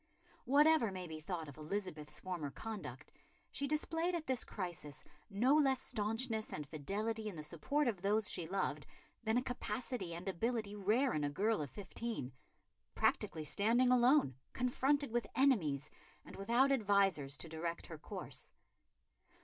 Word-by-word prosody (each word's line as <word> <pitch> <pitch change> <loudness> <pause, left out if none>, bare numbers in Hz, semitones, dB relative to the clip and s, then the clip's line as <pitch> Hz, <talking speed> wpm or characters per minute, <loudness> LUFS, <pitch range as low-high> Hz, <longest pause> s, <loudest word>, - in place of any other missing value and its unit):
Whatever 290 -4 +5
may 185 -1 -5
be 160 -2 -6
thought 165 -1 -4
of 145 - -10
Elizabeth's 155 -2 -4
former 175 -6 -3
conduct, 220 +9 -7 0.4
she 280 - -2
displayed 325 +4 0
at 325 -2 -3
this 260 -3 0
crisis 170 -7 -5 0.3
no 230 +7 +3
less 270 -4 +4
staunchness 225 -1 -1
and 150 -1 -5
fidelity 215 +9 -2
in 195 - -8
the 155 - -6
support 215 - 0
of 205 -7 -1
those 210 +2 +3
she 165 - -1
loved 155 -6 -1 0.4
than 220 +1 +2
a 250 - +2
capacity 245 -7 -3
and 175 +3 -7
ability 215 +3 -1
rare 215 +7 +2
in 150 - 0
a 145 - +1
girl 205 +6 +1
of 145 - -4
fifteen, 205 - -5 0.6
practically 155 -1 +1
standing 235 - +3
alone, 250 - +5 0.2
confronted 270 +2 +1
with 240 0 0
enemies, 160 - +2 0.3
and - - -10
without 235 +7 +3
advisers 195 - +3
to 135 - -6
direct 165 +1 -4
her 160 -2 -8
course. - - -6
210 Hz, 150 wpm, -37 LUFS, 165-250 Hz, 0.6 s, Whatever